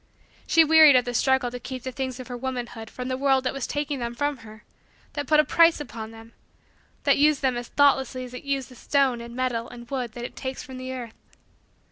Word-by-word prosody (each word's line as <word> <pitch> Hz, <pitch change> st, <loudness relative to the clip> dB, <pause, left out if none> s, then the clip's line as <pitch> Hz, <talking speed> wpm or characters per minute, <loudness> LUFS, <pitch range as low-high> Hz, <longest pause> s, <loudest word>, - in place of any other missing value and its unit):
She 330 Hz, -, +6 dB
wearied 315 Hz, -2 st, +7 dB
of 250 Hz, -, +4 dB
the 245 Hz, -, -3 dB
struggle 265 Hz, 0 st, +2 dB
to 245 Hz, -, -6 dB
keep 255 Hz, 0 st, -7 dB
the 260 Hz, -, -4 dB
things 260 Hz, -1 st, -4 dB
of 255 Hz, -, -8 dB
her 250 Hz, -, -6 dB
womanhood 245 Hz, -3 st, -5 dB
from 250 Hz, 0 st, -6 dB
the 255 Hz, 0 st, -2 dB
world 270 Hz, -1 st, +2 dB
that 255 Hz, -, -1 dB
was 275 Hz, -2 st, -4 dB
taking 290 Hz, -1 st, -2 dB
them 235 Hz, 0 st, -4 dB
from 290 Hz, +2 st, -1 dB
her 220 Hz, -1 st, -14 dB, 0.5 s
that 290 Hz, -2 st, -4 dB
put 305 Hz, +1 st, +4 dB
a -, -, +7 dB
price 335 Hz, +1 st, +4 dB
upon 225 Hz, -6 st, -7 dB
them 225 Hz, +1 st, -14 dB, 0.7 s
that -, -, +3 dB
used 295 Hz, -1 st, +3 dB
them 260 Hz, -2 st, +2 dB
as 240 Hz, 0 st, -5 dB
thoughtlessly 265 Hz, -3 st, +2 dB
as 250 Hz, 0 st, -10 dB
it 250 Hz, -, -8 dB
uses 275 Hz, -2 st, -2 dB
the 255 Hz, -, -14 dB
stone 265 Hz, -1 st, +1 dB
and 235 Hz, 0 st, -9 dB
metal 245 Hz, -2 st, -2 dB
and 240 Hz, 0 st, -12 dB
wood 250 Hz, -4 st, -3 dB
that 240 Hz, 0 st, -6 dB
it -, -, -9 dB
takes 260 Hz, -1 st, -5 dB
from 260 Hz, -1 st, -9 dB
the 255 Hz, 0 st, -6 dB
earth. 245 Hz, -3 st, -8 dB
255 Hz, 235 wpm, -25 LUFS, 240-275 Hz, 0.7 s, wearied